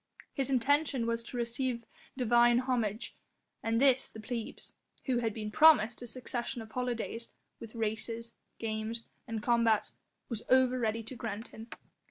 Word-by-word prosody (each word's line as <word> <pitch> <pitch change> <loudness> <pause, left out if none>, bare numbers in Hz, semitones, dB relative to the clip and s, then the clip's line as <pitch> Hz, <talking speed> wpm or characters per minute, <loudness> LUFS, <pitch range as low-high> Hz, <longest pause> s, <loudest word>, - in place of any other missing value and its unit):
His 270 -1 0
intention 270 0 +2
was 230 0 0
to 245 - -6
receive 235 0 -1 0.3
divine 240 -1 +5
homage, 235 -4 -1 0.5
and 225 0 +1
this 265 -1 +4
the 220 - -10
plebs 230 0 -5 0.3
who 255 -3 +1
had 225 -2 0
been 215 0 -5
promised 245 -5 +6
a 245 - -6
succession 240 0 -3
of 220 - -14
holidays, 235 -2 -3 0.3
with 230 0 -10
races, 225 +1 -2 0.2
games, 225 +1 -3 0.2
and 225 -2 -4
combats 230 -2 +2 0.3
was 230 -3 -2
over 255 0 +5
ready 225 -1 0
to 240 +4 -8
grant 220 -1 -5
him. 225 +1 -10
235 Hz, 150 wpm, -32 LUFS, 225-250 Hz, 0.5 s, promised